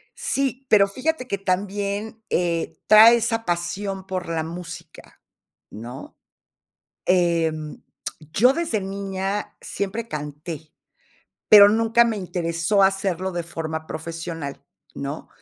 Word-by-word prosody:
Sí, 275 - -2
pero 200 -2 +6
fíjate 255 +5 -2
que 200 -4 -1
también, 200 +3 -2
eh, 170 -2 -1
trae 220 +2 +9
esa 225 0 -1
pasión 190 +3 -3
por 185 -2 -4
la 165 -1 -1
música, 170 0 -10 0.5
¿no?, 120 +5 -9 0.9
em, 165 -4 +1 0.5
yo 245 +8 +5
desde 275 -9 -1
niña, 195 +1 -4
siempre 210 +4 -4
canté, 155 0 -7 0.8
pero 205 -1 +10
nunca 225 +2 +4
me 225 - -1
interesó 175 +1 0
hacerlo 190 -1 +1
de 175 - -2
forma 160 -1 -5
profesional, 165 -3 -6 0.3
¿no? 140 +3 -6
190 Hz, 110 wpm, -23 LUFS, 165-210 Hz, 0.9 s, pero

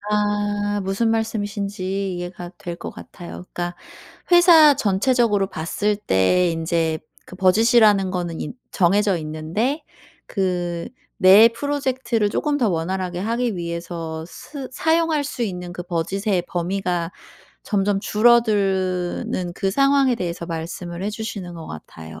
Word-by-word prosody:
아 205 0 0
무슨 195 +4 0
말씀이신지 200 -3 -2
이해가 175 0 -6
될 175 -1 -6
것 - - -7
같아요. 175 +1 -10
그러니까 175 0 -3 0.6
회사 335 -4 +8
전체적으로 210 -1 +2
봤을 205 +6 -1
때 180 - +2
인제 165 -1 0 0.3
그 - - -11
budge이라는 205 0 +4
거는 175 -2 -3
이 - - -4 0.2
정해져 195 +1 +2
있는데 160 - -2 0.4
그 175 -3 -2 0.3
내 200 +5 +8
프로젝트를 260 -4 -1
조금 295 +3 0
더 235 - +2
원활하게 180 +1 -2
하기 230 +1 -1
위해서 170 -1 -5
쓰 260 - -9
사용할 320 +1 +1
수 270 -3 -4
있는 180 -4 -4
그 180 - -6
budge의 180 +3 -1
범위가 175 -1 -2 0.5
점점 200 -1 +1
줄어드는 195 -6 +1
그 195 -1 -1
상황에 275 -1 +3
대해서 170 -4 -4
말씀을 170 +1 -5
해 205 - -1
주시는 205 -5 -6
것 165 -1 -8
같아요. 80 0 -10
195 Hz, 295 characters per minute, -22 LUFS, 175-225 Hz, 0.6 s, 회사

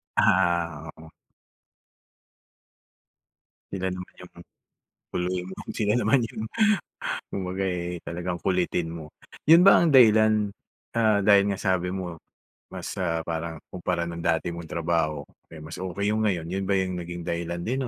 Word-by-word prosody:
Ah, 85 -4 +2
oo. 80 0 -13 2.6
Sila 95 -1 -2
naman 90 0 -7
yung 90 - -14 0.8
guluhin 90 0 -2
mo, - - -8 0.2
sila 105 -1 +1
naman 135 +2 +3
yung 110 -1 -5 0.9
kumbaga, 95 0 -3
eh, 90 -1 -2
talagang 90 +1 -3
kulitin 90 -3 0
mo. 80 -2 -7 0.4
Yun 170 +3 +8
ba 195 - +8
ang 170 - +3
dahilan, 110 -5 +5 0.4
ah, 110 -4 +2
dahil 100 -1 +5
nga 100 - -1
sabi 95 -2 0
mo 90 -3 -5 0.5
mas, - - -6
ah, 85 -2 -1
parang 80 0 -4 0.2
kumpara 90 -1 -1
no'n 85 0 -6
dati 85 +1 0
mong 85 -2 -8
trabaho, 80 -3 -1 0.3
eh, 80 - -9
mas 80 - -8
okey 100 +3 -1
yung 110 0 +1
ngayon. 85 -4 -1
Yun 95 +2 -2
ba 100 - +3
yung 90 -2 -1
naging 85 0 -6
dahilan 85 0 -3
din 130 +2 -1
90 Hz, 145 wpm, -26 LUFS, 85-100 Hz, 2.6 s, Yun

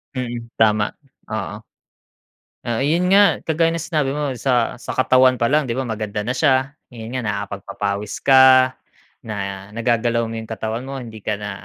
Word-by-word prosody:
Mm. 120 -2 -4 0.2
Tama. 105 -1 +3 0.4
Oo. 105 -1 -4 1.1
Ah, 115 -1 -1
ayun 170 +5 +1
nga. 200 +1 +5
Kagaya 165 +1 +1
ng 165 - -3
sinabi 150 -4 -1
mo 150 -1 -2
sa 120 -1 0
sa - - -6
katawan 130 -1 +3
pa 115 - +3
lang, 150 +2 +2
'di 120 - -3
ba 130 +1 -3
maganda 105 -1 -3
na 125 +5 -3
siya, 135 -1 +2 0.2
ayun 115 +1 -7
nga 130 - -2
nakapagpapawis 100 0 -4
ka, 130 -1 +6 0.5
na 100 -2 -5
nagagalaw 115 0 0
mo 115 - -5
'yung 110 0 -7
katawan 110 +2 -4
mo, 135 0 -6
hindi 110 -4 -10
ka - - -1
na 105 0 -4
120 Hz, 170 wpm, -20 LUFS, 110-135 Hz, 1.1 s, ka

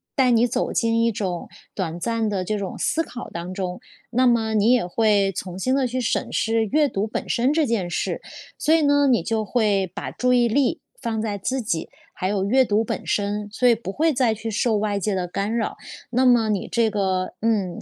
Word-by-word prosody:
带 260 -3 +3
你 235 +1 +4
走 245 - -1
进 230 0 +1
一 230 0 +3
种 190 -5 -3 0.3
短 175 -3 -3
暂 225 +3 -1
的 190 -3 -1
这 215 +1 -1
种 195 -2 -5
思 325 - 0
考 245 -5 -8
当 170 +2 -5
中， 180 -2 -4 0.3
那 255 +1 +3
么 225 -2 +2
你 215 +2 +3
也 240 -8 +2
会 200 0 +2
重新 190 +7 -3
地 265 -2 +1
去 255 +2 -3
审 230 - -1
视 225 0 +1
阅 295 +6 +2
读 200 +3 -2
本 - - -4
身 250 +4 +2
这 315 -2 +2
件 205 -7 -1
事。 - - -2 0.4
所 310 - +3
以 325 - +3
呢， 285 0 +4
你 240 -10 +3
就 220 +1 -1
会 205 -4 +1
把 - - -5
注 250 0 0
意 240 -1 +4
力 280 +6 +1 0.2
放 225 -3 -2
在 210 -2 -2
自 260 +7 -2
己， 170 -7 -2 0.2
还 185 - -3
有 195 -1 0
阅 260 +5 +4
读 215 -1 +1
本 - - -5
身， 205 0 -1
所 250 +3 +2
以 235 - +7
不 220 -4 -4
会 315 +6 +1
再 245 -4 +2
去 225 +1 -5
受 225 +1 +1
外 205 -1 -1
界 200 0 -1
的 180 -1 -2
干 200 +5 -2
扰。 225 - -1 0.4
那 255 +2 +2
么 235 -3 +4
你 200 -3 -1
这 230 -2 +1
个 190 -3 -1
嗯， 205 -6 0
220 Hz, 240 characters per minute, -23 LUFS, 200-245 Hz, 0.4 s, 以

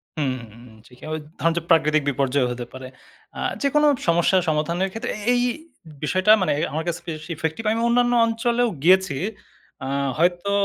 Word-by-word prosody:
হুম, 140 -4 0 0.2
হুম। 120 +3 -15 0.2
ঠিক। 125 - -18
ঐ - - -5 0.3
ধরেন 165 0 +2
যে, - - +1
প্রাকৃতিক 155 -2 +4
বিপর্যয় 135 -1 +1
হতে 120 0 -5
পারে। 130 0 -8 0.5
অ্যা - - -9 0.2
যেকোনো 295 +2 +3 0.2
সমস্যা 170 +3 +3
সমাধানের 170 +5 0
ক্ষেত্রে 225 +5 -4 0.2
এই 245 - +2 0.6
বিষয়টা 185 +6 +3
মানে 185 - +1 0.2
আমার 160 +1 -2
কাছে 170 +1 -2
বেশ 155 -1 -5
ইফেক্টিভ। 160 +7 -3
আমি 225 - 0
অন্যান্য 245 0 +3
অঞ্চলেও 235 +1 0
গিয়েছি। 185 -4 +4 0.7
অ্যা 130 - -5 0.3
হয়তো 175 +4 +1
170 Hz, 160 wpm, -23 LUFS, 150-220 Hz, 0.7 s, প্রাকৃতিক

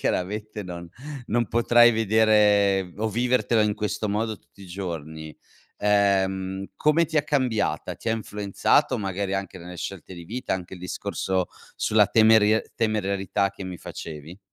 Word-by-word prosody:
chiaramente 105 +3 -2
non 85 -2 -8 0.4
non 120 +1 +1
potrai 120 0 +5
vedere 105 -3 +3
o 110 +1 -1
vivertelo 120 0 +1
in 105 -1 +2
questo 105 0 -2
modo 110 +1 -2
tutti 100 - -19
i - - -11
giorni. 80 -4 -6 0.4
Ehm 95 -2 +1
come 155 +3 +3
ti 160 0 0
ha - - +2
cambiata? 125 - -1
Ti - - -6
ha - - +2
influenzato 110 +5 +1
magari 100 -1 -2
anche 95 -1 -4
nelle 90 +1 -9
scelte 95 0 -7
di 85 -1 -10
vita 115 +1 -3
anche 95 0 -7
il 90 - -12
discorso 90 0 -2 0.3
sulla 105 -2 +3
temeria 110 -1 +5
sulla - - -10
temerarietà 100 -2 0
che 100 -1 -9
mi 90 -1 -6
facevi? 80 +3 -9
100 Hz, 155 wpm, -25 LUFS, 95-110 Hz, 0.4 s, potrai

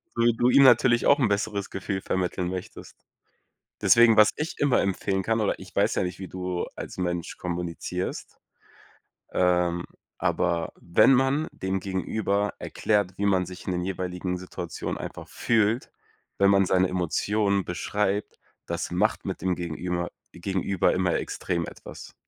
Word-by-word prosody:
so 115 - 0
wie 120 -1 +4
du 120 +2 +3
ihm 140 - +6
natürlich 120 -1 +5
auch 140 - +5
'n 125 - +3
besseres 100 -1 -1
Gefühl 95 0 -4
vermitteln 90 -1 -1
möchtest. 90 -1 -7 0.9
Deswegen, 120 -1 +6
was 105 0 +8
ich 150 +2 -4
immer 145 -3 +3
empfehlen 95 0 -1
kann 115 +2 +1
oder 105 - 0
ich - - -13
weiß - - +2
ja - - +1
nicht, 90 0 -4
wie 95 - -6
du 90 -1 -3
als - - -7
Mensch 90 -2 -3
kommunizierst, 90 +1 -4 0.9
ähm, 90 -1 +2 0.3
aber 85 -2 0
wenn 110 +9 +5
man 135 +4 +2
dem 95 0 -2
Gegenüber 100 +2 -1
erklärt, 100 -4 0
wie 100 - 0
man 95 -2 +2
sich 90 0 -10
in 95 - -1
den 90 0 -1
jeweiligen 90 0 -3
Situationen 90 -2 -5
einfach - - -7
fühlt, 115 +1 +1 0.5
wenn 100 0 +5
man 100 -1 +4
seine 95 0 +3
Emotionen 100 +3 0
beschreibt, 100 +3 -2 0.3
das - - -3
macht - - 0
mit - - -4
dem 95 -1 0
gegenüber 85 +1 -3 0.2
gegenüber 95 +1 0
immer 90 -2 +1
extrem 85 -2 -2
etwas. - - -10
95 Hz, 155 wpm, -26 LUFS, 90-105 Hz, 0.9 s, was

